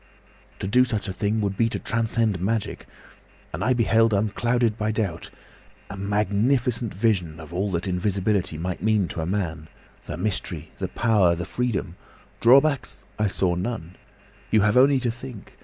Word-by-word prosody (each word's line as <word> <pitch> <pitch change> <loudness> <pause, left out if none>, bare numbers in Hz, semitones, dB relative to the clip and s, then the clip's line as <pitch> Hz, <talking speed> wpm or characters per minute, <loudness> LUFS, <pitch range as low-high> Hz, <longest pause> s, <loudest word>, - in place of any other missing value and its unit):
"To - - -5
do 125 +6 +5
such 110 -4 -2
a 95 - -3
thing 105 +3 -1
would 100 -1 -1
be 115 +3 +2
to - - -3
transcend 115 -4 0
magic. 110 +2 -2 0.7
And - - -3
I 130 - +3
beheld, 115 -2 +3
unclouded 115 +2 +1
by 110 -1 -1
doubt, 100 -7 -2 0.6
a - - -6
magnificent 105 +4 +1
vision 90 -6 0
of 80 0 -10
all 95 +3 -1
that 85 0 -1
invisibility 95 -1 0
might 90 +3 -4
mean 105 -4 +2
to 80 - -4
a 80 - -3
man—the 85 -5 -5
mystery, 105 -3 -3
the - - -2
power, 105 -7 +2
the 85 +1 -4
freedom. 100 -8 -2 0.4
Drawbacks 135 +4 +3
I 105 - +2
saw 90 -2 +1
none. 90 -2 -4 0.5
You 110 - +4
have 105 +1 +2
only 135 +2 +5
to 120 -2 0
think! 120 -3 -10
105 Hz, 160 wpm, -24 LUFS, 95-115 Hz, 0.7 s, do